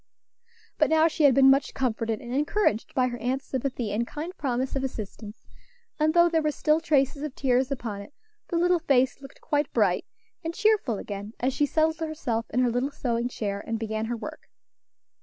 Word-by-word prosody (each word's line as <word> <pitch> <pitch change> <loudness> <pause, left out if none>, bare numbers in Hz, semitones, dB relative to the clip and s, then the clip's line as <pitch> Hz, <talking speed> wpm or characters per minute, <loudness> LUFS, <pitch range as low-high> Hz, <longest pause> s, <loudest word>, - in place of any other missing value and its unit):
But - - +4
now 320 0 +5
she 315 -2 +1
had 270 -3 +6
been 270 0 +7
much 275 +1 +1
comforted 230 -3 -1
and 240 0 -6
encouraged 290 - 0
by 255 -1 +3
her 240 -1 -6
aunt's 260 +4 -2
sympathy 255 -4 -3
and 230 +3 -1
kind 325 +5 -6
promise 260 -1 -2
of 270 - -1
assistance, 215 -3 -7 0.5
and, 310 +2 +2
though 345 0 +7
there 330 -1 +1
were 305 - +1
still 305 +1 +2
traces 285 -3 +1
of 300 -3 -5
tears 255 -1 +1
upon 225 -7 -4
it, 200 - -13 0.3
the 345 - -3
little 355 +1 +3
face 270 -4 +2
looked 270 -1 -13
quite 295 -2 0
bright 200 -6 +2 0.4
and 330 +1 -4
cheerful 415 - +2
again 205 +2 -6
as 255 +2 0
she 290 - +1
settled 315 +2 +1
herself 300 -8 -3
in 250 - +1
her 245 -2 +2
little 250 +4 0
sewing 240 -3 -2
chair, 200 -4 -4
and 225 - -1
began 220 0 -3
her 235 +1 -3
work. - - -9
265 Hz, 195 wpm, -26 LUFS, 230-305 Hz, 0.5 s, been